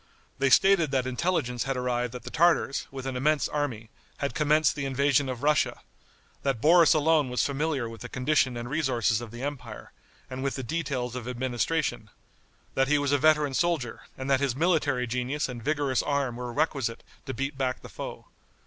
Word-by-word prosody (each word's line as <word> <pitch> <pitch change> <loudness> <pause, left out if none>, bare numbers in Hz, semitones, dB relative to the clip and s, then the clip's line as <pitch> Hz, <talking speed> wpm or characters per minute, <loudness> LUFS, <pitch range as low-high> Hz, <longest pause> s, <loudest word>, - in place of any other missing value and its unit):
They 135 0 +3
stated 190 +1 +5
that 130 -2 0
intelligence 130 -3 -1
had 135 -1 -1
arrived 125 -1 -1
that 125 - -7
the - - -8
Tartars, 160 -4 +2
with 135 -1 -7
an 135 -1 -3
immense 150 +4 +2
army, 125 -7 -3 0.3
had 140 -1 -2
commenced 150 0 +3
the 140 -2 -3
invasion 140 0 +2
of 130 0 -5
Russia; 150 0 +2 0.6
that 135 -5 -1
Boris 165 +4 +6
alone 155 -2 +3
was 125 - +1
familiar 140 -3 -1
with 115 0 -10
the 125 - -7
condition 130 -1 +1
and 120 0 -5
resources 125 -6 +1
of 120 - -7
the 120 +3 -8
empire, 145 -3 -6 0.4
and 130 +1 -6
with 140 - -1
the 130 - -4
details 130 -4 -3
of 125 -2 -5
administration 125 0 -1 0.6
that 135 0 +2
he 150 +1 +3
was 145 -1 0
a 145 - +3
veteran 150 -1 +3
soldier, 140 -4 -1 0.2
and 130 - -5
that 135 -1 +3
his 140 -3 0
military 145 -5 +1
genius 125 +5 -2
and 125 -2 -7
vigorous 145 -3 +1
arm 140 -4 -1
were 125 0 -5
requisite 135 -4 -1 0.2
to 130 - -3
beat 135 +2 -3
back 130 -1 -2
the - - -8
foe. - - -8
135 Hz, 190 wpm, -27 LUFS, 125-150 Hz, 0.6 s, Boris